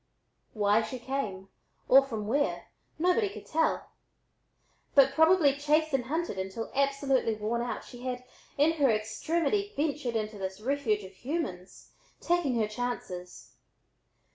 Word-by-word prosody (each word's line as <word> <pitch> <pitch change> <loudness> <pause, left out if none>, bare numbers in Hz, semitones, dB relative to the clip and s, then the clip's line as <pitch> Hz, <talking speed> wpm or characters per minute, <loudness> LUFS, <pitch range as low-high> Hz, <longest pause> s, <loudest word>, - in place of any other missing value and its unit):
Why 210 0 +3
she 255 +3 -5
came, 230 -7 -4 0.4
or 270 +2 +8
from 225 -6 -5
where, 285 +6 0 0.3
nobody 360 +6 +2
could 405 - -10
tell, 320 +1 0 1.0
but 275 -1 +6
probably 320 -2 +5
chased 300 +2 +1
and 260 -3 +1
hunted 315 - -2
until 190 +4 -4
absolutely 275 -4 +1
worn 215 +3 -1
out, 240 - -3
she 245 -1 -12
had 250 0 -4 0.3
in 295 +3 +5
her 275 - +5
extremity 320 - 0
ventured 290 -5 -1
into 215 -1 -2
this 190 0 -4
refuge 225 -4 0
of 190 0 -11
humans, 195 - -5 0.3
taking 340 -7 +1
her 220 -2 +1
chances. 210 -6 -5
255 Hz, 135 wpm, -29 LUFS, 215-295 Hz, 1.0 s, or